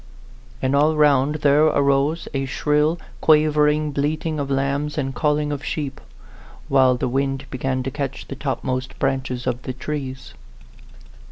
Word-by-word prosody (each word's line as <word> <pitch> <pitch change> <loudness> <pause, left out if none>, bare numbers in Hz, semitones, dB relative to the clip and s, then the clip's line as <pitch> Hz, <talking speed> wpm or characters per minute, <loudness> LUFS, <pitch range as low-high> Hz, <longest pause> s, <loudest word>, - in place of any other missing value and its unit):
And 130 +2 +2
all 150 +2 +3
round 145 -1 +3
there 145 +2 +5
arose 140 +2 +2
a 135 -1 -1
shrill, 150 +4 +1 0.2
quavering 150 -1 +3
bleating 155 +2 -1
of 140 -1 -3
lambs 140 +2 -1
and 135 -2 -1
calling 150 +2 0
of 145 -1 -4
sheep, 140 -3 -4 0.7
while 130 -2 +4
the 125 - -1
wind 135 +1 -1
began 130 0 -2
to 135 - -3
catch 135 -1 -5
the 135 - -6
topmost 130 -2 -3
branches 130 -2 -2
of 125 -1 -2
the 130 - -5
trees. 130 - -6
140 Hz, 145 wpm, -22 LUFS, 135-150 Hz, 0.7 s, there